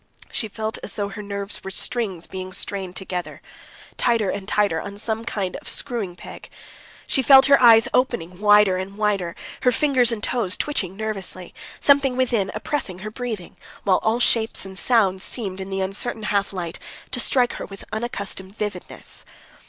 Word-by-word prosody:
She 220 - -2
felt 220 +1 -4
as - - -7
though 200 -1 -2
her 205 +1 -7
nerves 200 -1 0
were 190 - -5
strings 195 -3 -1
being 185 0 -7
strained 190 -3 -2
tighter 195 +4 -3
and 200 -1 -5
tighter 205 -6 +1
on 200 0 -8
some 225 +2 -3
sort 195 -5 -2
of - - -8
screwing 225 -9 -2
peg. - - -11 0.6
She 265 - +3
felt 265 +1 +8
her 280 -1 +6
eyes 225 -2 +8
opening 180 -9 0
wider 205 -2 +5
and 195 +2 -6
wider, 200 -5 0 0.3
her 250 - +4
fingers 255 -2 +3
and 225 -2 -4
toes 225 -7 0
twitching 195 -11 -2
nervously, 195 -4 -4 0.3
something 275 -3 +4
within 235 -7 +1
oppressing 215 -4 -2
her 215 - -5
breathing, 220 -6 -6 0.3
while 185 -2 +3
all 225 +2 +1
shapes 225 -4 +3
and 190 0 -9
sounds 195 -4 +2
seemed 195 -6 -3
in 190 - -6
the 195 0 -2
uncertain 200 +4 -2
half 200 -1 0
light 175 -4 -5 0.3
to 255 - -1
strike 245 0 +3
her - - -6
with 195 0 -11
unaccustomed 200 -3 -4
vividness. 205 -4 -5
205 Hz, 170 wpm, -23 LUFS, 190-235 Hz, 0.6 s, felt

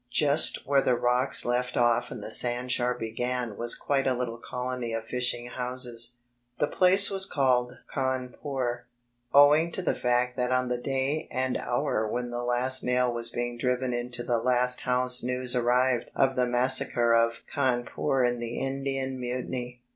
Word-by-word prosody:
Just 150 0 +2
where 140 -1 +2
the 125 - +1
rocks 125 +3 +2
left 125 +1 -2
off 120 0 +1
and - - -8
the - - -5
sandshore 125 0 +3
began 120 0 -4
was 120 +2 +2
quite 135 -1 -1
a 130 - +1
litde 120 -1 -5
colony 125 -2 -5
of 115 0 -4
fishing 125 0 -2
houses. 125 -1 -1 0.4
The - - +1
place 190 +6 +5
was 190 -1 +2
called 125 -5 0 0.2
Cawn 130 -2 -3
pore, 125 -4 -4 0.4
owing 150 +4 +5
to 185 - -3
the - - 0
fact 125 +1 -1
that 125 0 -1
on 130 -1 0
the 125 -1 -2
day 135 +3 -2
and 130 0 -2
hour 120 -3 -2
when 120 +2 -4
the 120 0 -4
last 125 +2 +4
nail 125 -1 0
was 115 0 +2
being 120 0 -4
driven 125 0 -1
into 120 0 -4
the 120 -1 -1
last 125 +1 +1
house 125 0 +1
news 125 0 -3
arrived 125 0 +1
of 135 0 +1
the 125 -1 +1
massacre 120 -1 +3
of 115 0 +2 0.2
Cawnpore 130 -1 -1
in 120 0 -3
the 120 0 -6
Indian 135 -1 -4
Mutiny. 125 0 -6
125 Hz, 170 wpm, -26 LUFS, 120-130 Hz, 0.4 s, place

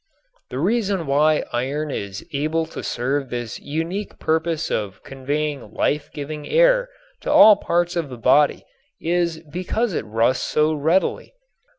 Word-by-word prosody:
The - - -5
reason 195 - 0
why 150 +2 +3
iron 140 +5 -2
is 100 -3 -5
able 155 +3 0
to 160 - -8
serve 135 +2 -2
this 120 -2 -5
unique 165 +7 -4
purpose 160 0 -1
of 100 -3 -3
conveying 140 -2 -3
life 150 0 0
giving 150 +1 -6
air - - +4 0.3
to - - -3
all 215 0 +9
parts 175 -2 0
of 165 -5 -2
the 125 - -8
body 140 +5 +3 0.3
is 170 -1 0
because 185 +7 -2
it - - -1
rusts 115 +4 +1
so 155 +1 +2
readily. 160 - 0
155 Hz, 145 wpm, -22 LUFS, 135-170 Hz, 0.3 s, all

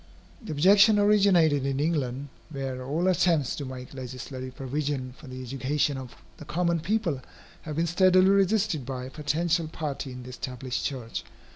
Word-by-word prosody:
The 220 - -6
objection 200 +7 +6
originated 195 -8 +4
in 135 0 -1
England, 145 -3 -1 0.2
where 135 -3 -4
all 155 +7 0
attempts 170 -6 +2
to 145 - -4
make 130 0 -8
legislative 130 0 -7
provision 135 -1 -3
for 150 - -14
the 130 0 -7
education 135 +3 0
of 130 -2 -8 0.2
the 150 - -10
common 170 +2 0
people 170 - -1 0.4
have 155 -2 -6
been 165 +2 +1
steadily 185 +2 +5
resisted 200 -5 +2
by 130 0 -5
a 130 - -9
potential 160 +3 0
party 145 -4 -4
in 125 0 -8
the 125 - -9
established 125 0 -4
church. 125 -5 -4
145 Hz, 160 wpm, -27 LUFS, 130-170 Hz, 0.4 s, objection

